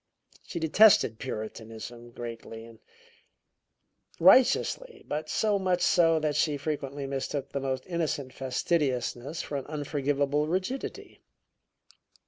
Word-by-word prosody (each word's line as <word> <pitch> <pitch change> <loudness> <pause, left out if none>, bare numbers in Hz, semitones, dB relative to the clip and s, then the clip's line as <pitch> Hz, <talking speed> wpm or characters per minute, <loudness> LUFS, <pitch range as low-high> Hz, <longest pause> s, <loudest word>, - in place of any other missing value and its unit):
She - - -6
detested 170 - +5
puritanism 115 0 -7
greatly, 115 -1 -8
and 115 -1 -15 1.4
righteously, 265 - +4
but 155 +1 -3
so 210 -2 +1
much 185 -2 +1
so 165 -2 +4
that 150 -1 0
she 150 -2 +1
frequently 140 -1 -4
mistook 135 0 -3
the 140 - -2
most 130 -1 -3
innocent 155 -7 -2
fastidiousness 135 +1 -1
for 145 - -4
an 135 - -6
unforgivable 145 -1 -1
rigidity. 190 +11 -4
145 Hz, 110 wpm, -28 LUFS, 130-170 Hz, 1.4 s, detested